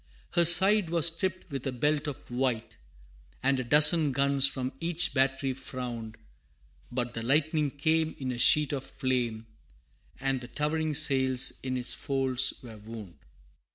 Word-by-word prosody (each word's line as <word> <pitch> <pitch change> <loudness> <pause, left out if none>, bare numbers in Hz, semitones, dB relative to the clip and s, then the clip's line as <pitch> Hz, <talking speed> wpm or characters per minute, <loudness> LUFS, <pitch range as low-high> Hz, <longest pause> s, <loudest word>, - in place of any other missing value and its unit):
Her 170 - +3
side 190 +2 +6
was 170 -2 +1
striped 185 0 -5
with 135 -1 -5
a - - -2
belt 150 +4 -1
of 140 -3 -8
white, 120 -2 -2 0.7
And 135 0 +1
a - - -2
dozen 150 +3 +5
guns 140 0 +2
from 130 -1 -4
each 175 -1 0
battery 135 0 0
frowned, 120 -5 -7 0.7
But 120 -1 -3
the 115 - -5
lightning 150 +4 0
came 160 +3 -1
in 130 -2 -4
a 120 - -6
sheet 150 +4 +4
of 135 -2 -4
flame,[B] 125 -5 -3 0.7
And 135 -1 -1
the 120 - -7
towering 155 +3 -2
sails 130 -2 0
in 130 -1 -3
its 125 - +1
folds 130 -3 +1
were 115 -3 -11
wound. 105 -4 -11
135 Hz, 155 wpm, -28 LUFS, 125-155 Hz, 0.7 s, side